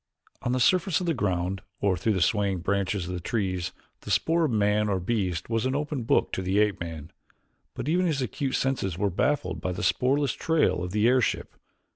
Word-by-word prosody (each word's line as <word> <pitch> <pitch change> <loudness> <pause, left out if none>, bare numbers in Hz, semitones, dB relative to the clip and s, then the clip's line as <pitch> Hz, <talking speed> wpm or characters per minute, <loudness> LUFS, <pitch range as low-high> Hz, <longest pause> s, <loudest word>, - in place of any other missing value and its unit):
On 120 - -1
the 130 - +1
surface 180 +7 +3
of 180 - -3
the 170 - +1
ground 95 - -1 0.2
or 100 -2 +2
through 105 +5 0
the 95 -4 +2
swaying 100 -4 +1
branches 100 -1 -1
of 90 - -4
the 90 - -3
trees 95 -2 -2 0.3
the - - -10
spoor 160 +11 +2
of 145 - 0
man 105 -1 +2
or 95 -2 +1
beast 90 -4 -1
was 115 +1 0
an 130 - -1
open 145 -2 -2
book - - +2
to - - -2
the 95 +2 0
ape 105 -2 +2
man, 80 -2 -7 0.6
but - - -5
even 180 +3 +2
his 155 -4 0
acute 130 +1 -2
senses 120 -10 -1
were 100 0 0
baffled 145 +11 0
by 95 - -2
the - - -5
spoorless 135 +1 +2
trail 125 - +1
of 90 - -3
the 105 +4 +2
airship. 125 -1 +1
105 Hz, 210 wpm, -27 LUFS, 95-130 Hz, 0.6 s, surface